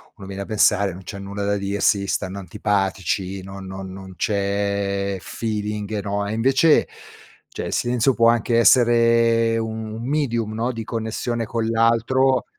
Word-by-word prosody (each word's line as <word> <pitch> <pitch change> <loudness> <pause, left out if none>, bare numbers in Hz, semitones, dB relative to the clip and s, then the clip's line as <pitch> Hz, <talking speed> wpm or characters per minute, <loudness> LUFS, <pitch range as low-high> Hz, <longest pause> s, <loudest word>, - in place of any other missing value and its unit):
uno 95 - -11
viene 100 0 -6
da - - -9
pensare: 105 -2 +3
"Non 95 +2 -11
c'è 100 - -7
nulla 100 +1 -5
da 100 0 +1
dirsi, 100 0 +1
stanno 95 +1 -2
antipatici, 95 -1 -2
non 95 0 -9
no 95 +1 -7
non 95 0 -9
c'è 100 0 -1
feeling", 105 -1 -3
no? 100 0 -2
E 105 - -3
invece, 135 +7 +3 0.6
cioè, - - -6
il - - -4
silenzio 120 +2 +2
può 115 0 +5
anche 115 0 +2
essere 115 -1 +4
un 110 -1 -4
un 115 +1 -6
medium 120 -7 -1
no, 115 +3 -1
di 115 -2 -5
connessione 115 +1 -3
con 115 +1 -2
l'altro, 115 +4 +2
105 Hz, 155 wpm, -22 LUFS, 100-115 Hz, 0.6 s, può